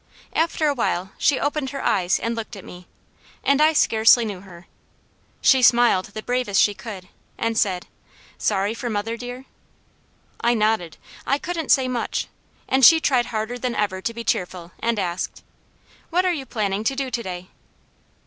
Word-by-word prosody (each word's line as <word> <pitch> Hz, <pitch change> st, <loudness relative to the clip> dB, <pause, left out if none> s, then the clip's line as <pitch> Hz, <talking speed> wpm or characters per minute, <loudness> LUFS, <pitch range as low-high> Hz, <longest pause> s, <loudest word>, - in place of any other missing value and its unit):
After 320 Hz, -1 st, +1 dB
a 290 Hz, -, +2 dB
while 190 Hz, -7 st, -1 dB
she 285 Hz, -, +3 dB
opened 290 Hz, -1 st, -1 dB
her 275 Hz, 0 st, -6 dB
eyes 185 Hz, -1 st, +1 dB
and 230 Hz, -, -2 dB
looked 225 Hz, 0 st, -6 dB
at 195 Hz, -, -11 dB
me, 180 Hz, 0 st, -12 dB, 0.6 s
and 280 Hz, +1 st, +3 dB
I 310 Hz, +1 st, +6 dB
scarcely 230 Hz, -3 st, +5 dB
knew 205 Hz, -4 st, -5 dB
her. 180 Hz, -2 st, -14 dB, 0.8 s
She 265 Hz, -2 st, +5 dB
smiled 240 Hz, -6 st, +5 dB
the 215 Hz, +2 st, -8 dB
bravest 245 Hz, -5 st, 0 dB
she 205 Hz, -, +4 dB
could 200 Hz, -4 st, -9 dB, 0.3 s
and 230 Hz, 0 st, -1 dB
said: 190 Hz, -5 st, 0 dB, 0.5 s
"Sorry 200 Hz, 0 st, 0 dB
for 240 Hz, +1 st, -5 dB
mother, 215 Hz, +1 st, -2 dB
dear?" 245 Hz, +2 st, -8 dB, 1.0 s
I 240 Hz, +1 st, +3 dB
nodded. 215 Hz, -7 st, 0 dB, 0.3 s
I 275 Hz, -, +2 dB
couldn't 325 Hz, -1 st, -4 dB
say 265 Hz, -1 st, +4 dB
much, 250 Hz, -2 st, -2 dB, 0.4 s
and 265 Hz, 0 st, +1 dB
she 320 Hz, +7 st, +9 dB
tried 255 Hz, -6 st, +2 dB
harder 220 Hz, +2 st, -3 dB
than 245 Hz, -1 st, -2 dB
ever 190 Hz, -3 st, -1 dB
to 230 Hz, -, -2 dB
be 230 Hz, 0 st, -7 dB
cheerful 180 Hz, -4 st, -2 dB
and 230 Hz, -1 st, 0 dB
asked: 180 Hz, -2 st, -3 dB, 0.7 s
"What 360 Hz, +2 st, +1 dB
are 365 Hz, -, +2 dB
you 275 Hz, -5 st, -5 dB
planning 205 Hz, -2 st, -2 dB
to 270 Hz, -, +1 dB
do 265 Hz, -1 st, -3 dB
to 240 Hz, -1 st, -2 dB
day?" 185 Hz, -3 st, -7 dB
230 Hz, 175 wpm, -22 LUFS, 195-260 Hz, 1.0 s, she